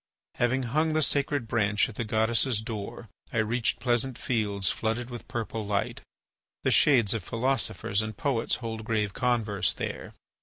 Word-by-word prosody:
Having 130 +2 +1
hung 155 +6 +1
the 155 0 +3
sacred 140 -3 0
branch 105 -2 +2
at 115 - -9
the 120 - -3
goddess's 110 +2 +2
door, 110 +1 -6 0.2
I - - -3
reached 110 +1 +1
pleasant 120 0 +1
fields 105 -5 0
flooded 115 +2 -2
with 120 -3 -8
purple 115 -1 -3
light. 100 -1 -2 0.6
The - - +2
shades 120 -9 +5
of 110 -5 -3
philosophers 115 -3 0
and 110 0 -5
poets 140 -8 0
hold 110 -1 -4
grave 105 -3 0
converse 115 -5 +1
there. - - -5
115 Hz, 155 wpm, -28 LUFS, 110-125 Hz, 0.6 s, shades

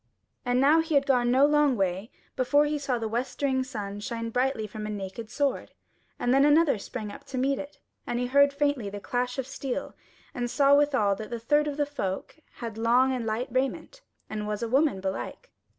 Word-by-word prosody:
And 245 0 +1
now 290 +4 +5
he 320 -1 0
had 280 0 +4
gone 245 -3 +2
no 260 +3 +5
long 295 -3 +3
way 190 +2 -1 0.3
before 285 +3 +3
he 295 0 -1
saw 275 -3 -1
the 225 -1 -3
westering 260 +3 -1
sun 205 -5 -6
shine 230 +2 -4
brightly 250 -2 0
from 210 +1 -6
a - - -5
naked 205 +2 -6
sword, 280 +3 -1 0.4
and 245 - +1
then 275 +1 +5
another 295 -4 +4
sprang 210 0 -6
up - - -11
to 265 - -6
meet 270 +2 +1
it, 290 0 -8 0.3
and 240 - -1
he 250 - 0
heard 280 +3 +4
faintly 285 -6 0
the 205 +1 -6
clash 245 +4 -2
of 265 - -2
steel, 270 +1 -4 0.4
and 245 -1 -2
saw 280 +2 +4
withal 280 -9 +3
that 215 - -7
the 235 - -4
third 295 +6 +2
of 290 -1 -3
the 295 - +2
folk 240 -3 -5
had 225 -3 -7
long 250 +3 +3
and 240 -3 -3
light 225 +4 -2
raiment 270 - -2 0.3
and 210 -1 -4
was 210 +1 -3
a - - -1
woman 270 -4 +2
belike. 195 - -5
250 Hz, 210 wpm, -27 LUFS, 220-280 Hz, 0.4 s, now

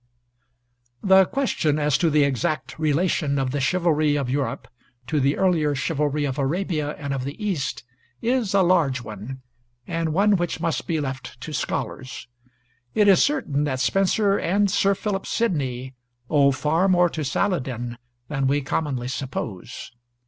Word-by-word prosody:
The 190 -1 +6
question 180 - 0
as 150 -2 +1
to 170 - +3
the 150 -1 +4
exact 155 +4 -1
relation 155 -1 +1
of 135 -2 0
the 140 0 -1
chivalry 155 -1 +2
of 135 -4 -1
Europe 135 -4 -2 0.4
to 150 +5 0
the 140 +1 +2
earlier 160 -6 +2
chivalry 145 +2 0
of 135 0 -3
Arabia 150 0 -1
and 140 -1 -4
of 135 -2 -2
the 140 +3 -5
East 190 - -2 0.4
is 235 -5 0
a 195 - +5
large 155 -9 +2
one, 110 +5 -8 0.4
and 165 -2 -2
one 200 +4 +3
which 175 -2 -2
must 165 -1 -2
be 160 -2 0
left 130 -3 -5
to 155 - -6
scholars. 130 -2 -4 0.7
It 210 -1 +4
is 195 -3 +6
certain 150 - 0
that 130 -3 -2
Spenser 195 - +2
and 200 +3 +1
Sir 195 +2 +3
Philip 195 -1 -3
Sidney 130 - -1 0.4
owe 140 -2 +5
far 155 +7 +1
more 180 -2 +4
to 155 - -3
Saladin 125 - -2 0.3
than 135 -2 -1
we 145 +2 +2
commonly 135 -3 -2
suppose. 120 -6 -5
150 Hz, 155 wpm, -23 LUFS, 135-180 Hz, 0.7 s, The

